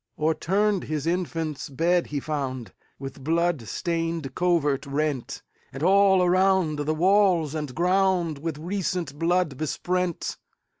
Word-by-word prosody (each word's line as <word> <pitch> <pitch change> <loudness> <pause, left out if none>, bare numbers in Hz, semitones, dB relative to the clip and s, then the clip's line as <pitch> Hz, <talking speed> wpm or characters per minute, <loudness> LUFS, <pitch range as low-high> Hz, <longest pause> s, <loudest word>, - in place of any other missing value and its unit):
O'erturned 190 +6 +1
his 150 -1 -3
infant's 165 -4 -2
bed 170 +6 +1
he 145 - -3
found, 135 -5 -4 0.2
With 135 0 -8
blood 165 0 +1
stained 165 - -2
covert 155 -6 +1
rent; 140 -2 -2 0.3
And 135 +3 -6
all 190 0 +5
around 185 -3 +2
the 150 +2 -1
walls 180 -3 +3
and 150 -5 -4
groundWith 175 -4 +1
recent 175 -4 -3
blood 170 -4 +1
besprent. 180 +3 -2
165 Hz, 115 wpm, -25 LUFS, 150-180 Hz, 0.3 s, all